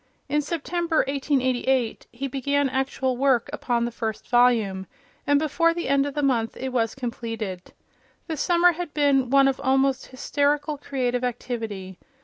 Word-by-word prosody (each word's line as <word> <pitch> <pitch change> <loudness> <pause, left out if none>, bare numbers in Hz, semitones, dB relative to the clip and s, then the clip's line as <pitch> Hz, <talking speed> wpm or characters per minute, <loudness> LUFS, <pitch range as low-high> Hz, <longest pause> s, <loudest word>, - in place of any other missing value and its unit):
In 295 +1 +1
September, 335 +2 -1
1888, 265 -3 0
he 270 +3 -4
began 280 +1 0
actual 265 0 -1
work 270 0 +2
upon 240 -5 0
the 240 - -3
first 220 -2 -4
volume, 225 -6 +3 0.4
and 285 0 +4
before 330 +3 +2
the 345 - -3
end 275 +1 +2
of 285 - -6
the 295 - -1
month 235 -5 0
it 265 - -3
was 225 -3 0
completed. 225 -7 -5 0.5
The 325 - -3
Summer 350 +3 +4
had 345 -2 -6
been 280 -4 +3
one 275 +1 +5
of 270 0 -1
almost 270 0 +2
hysterical 285 +3 -1
creative 250 -3 -2
activity. 225 -6 -4
265 Hz, 150 wpm, -24 LUFS, 240-285 Hz, 0.5 s, one